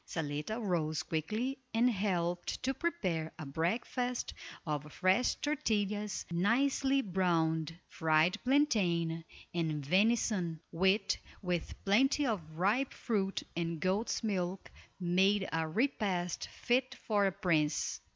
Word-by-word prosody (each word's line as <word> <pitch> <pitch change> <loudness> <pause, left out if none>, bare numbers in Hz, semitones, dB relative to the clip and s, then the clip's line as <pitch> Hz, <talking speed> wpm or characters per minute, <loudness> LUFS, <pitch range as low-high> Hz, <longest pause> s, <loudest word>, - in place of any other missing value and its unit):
Zaletta 150 +7 -3
rose 160 -7 0
quickly 215 - -2 0.2
and 235 +2 +4
helped 180 -5 -1
to 265 +1 +1
prepare 185 - -2
a 155 - -6
breakfast 230 - -1 0.3
of 150 -1 -3
fresh 185 +9 +2
tortillas 210 -8 -1
nicely 265 +9 +2
browned, 165 -4 +1
fried 160 +5 +2
plantain, 180 - +2 0.3
and 155 -4 -1
venison, 190 -2 +2
which, 190 +4 +2 0.2
with 180 -2 -2
plenty 270 +8 +4
of 220 -7 0 0.2
ripe 215 +10 +1
fruit 195 -4 -1
and 170 -1 -2
goat's 195 +8 0
milk, 190 -3 -2 0.3
made 190 +3 +3
a 160 0 0
repast 190 - -1
fit 255 +2 0
for 205 -3 +1
a - - +1
prince. 165 -6 0
190 Hz, 110 wpm, -33 LUFS, 165-225 Hz, 0.3 s, and